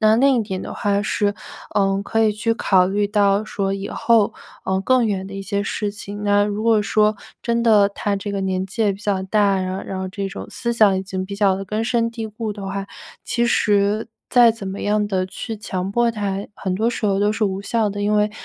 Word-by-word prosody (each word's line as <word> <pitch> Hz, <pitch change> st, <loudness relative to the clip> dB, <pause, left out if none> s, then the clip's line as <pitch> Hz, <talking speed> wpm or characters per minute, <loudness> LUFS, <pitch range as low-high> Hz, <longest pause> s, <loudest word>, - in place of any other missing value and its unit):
那 215 Hz, 0 st, +5 dB
另 270 Hz, +3 st, +4 dB
一 240 Hz, -, +2 dB
点 190 Hz, -3 st, -4 dB
的 -, -, -6 dB
话 200 Hz, -1 st, 0 dB
是， 205 Hz, 0 st, 0 dB, 0.4 s
呃， 195 Hz, 0 st, +2 dB
可 225 Hz, +2 st, +1 dB
以 215 Hz, -, +3 dB
去 220 Hz, +2 st, 0 dB
考 190 Hz, -5 st, +3 dB
虑 205 Hz, +1 st, +1 dB
到 205 Hz, 0 st, +2 dB
说 195 Hz, -2 st, -2 dB
以 195 Hz, 0 st, -4 dB
后， 225 Hz, -3 st, +2 dB, 0.3 s
呃， 190 Hz, 0 st, 0 dB
更 250 Hz, +3 st, +3 dB
远 195 Hz, -3 st, -1 dB
的 -, -, -10 dB
一 195 Hz, -, -5 dB
些 200 Hz, +1 st, -2 dB
事 205 Hz, 0 st, -2 dB
情， 205 Hz, -1 st, -7 dB
那 205 Hz, 0 st, +4 dB
如 210 Hz, +1 st, -3 dB
果 225 Hz, -2 st, +4 dB
说 210 Hz, +1 st, +2 dB, 0.2 s
真 235 Hz, 0 st, 0 dB
的 210 Hz, -3 st, +5 dB
他 200 Hz, 0 st, -2 dB
这 200 Hz, +1 st, -5 dB
个 200 Hz, -, -2 dB
年 190 Hz, 0 st, -1 dB
纪 195 Hz, +4 st, -2 dB
也 205 Hz, -2 st, +3 dB
比 195 Hz, -, -10 dB
较 200 Hz, -2 st, -1 dB
大 210 Hz, +3 st, +1 dB
啊， 195 Hz, -1 st, +2 dB
然 185 Hz, 0 st, -3 dB
后 -, -, -5 dB
然 190 Hz, -, -5 dB
后 190 Hz, -, -3 dB
这 195 Hz, +1 st, -4 dB
种 195 Hz, -, -7 dB
思 235 Hz, -1 st, -2 dB
想 205 Hz, -5 st, +4 dB
已 -, -, -3 dB
经 190 Hz, -1 st, -4 dB
比 200 Hz, +1 st, -6 dB
较 200 Hz, -2 st, +3 dB
地 195 Hz, +1 st, -5 dB
根 215 Hz, +3 st, -2 dB
深 230 Hz, -1 st, +1 dB
蒂 230 Hz, -1 st, -5 dB
固 215 Hz, 0 st, -5 dB
的 200 Hz, -1 st, -7 dB
话， 195 Hz, 0 st, -4 dB, 0.4 s
其 235 Hz, -, 0 dB
实 205 Hz, -1 st, +2 dB, 0.2 s
再 240 Hz, -3 st, +6 dB
怎 210 Hz, -4 st, -7 dB
么 195 Hz, +1 st, -5 dB
样 210 Hz, 0 st, +1 dB
地 185 Hz, -2 st, 0 dB
去 220 Hz, +4 st, -6 dB
强 190 Hz, -2 st, -4 dB
迫 240 Hz, +3 st, +2 dB
他， 200 Hz, -3 st, -2 dB, 0.2 s
很 190 Hz, -2 st, -3 dB
多 220 Hz, +4 st, +1 dB
时 235 Hz, -1 st, -3 dB
候 195 Hz, -2 st, +2 dB
都 205 Hz, +1 st, +2 dB
是 220 Hz, -, -3 dB
无 195 Hz, -1 st, -1 dB
效 220 Hz, +1 st, 0 dB
的。 205 Hz, +1 st, -5 dB
因 205 Hz, +1 st, +1 dB
为， 210 Hz, 0 st, +2 dB
205 Hz, 265 characters per minute, -21 LUFS, 195-220 Hz, 0.4 s, 再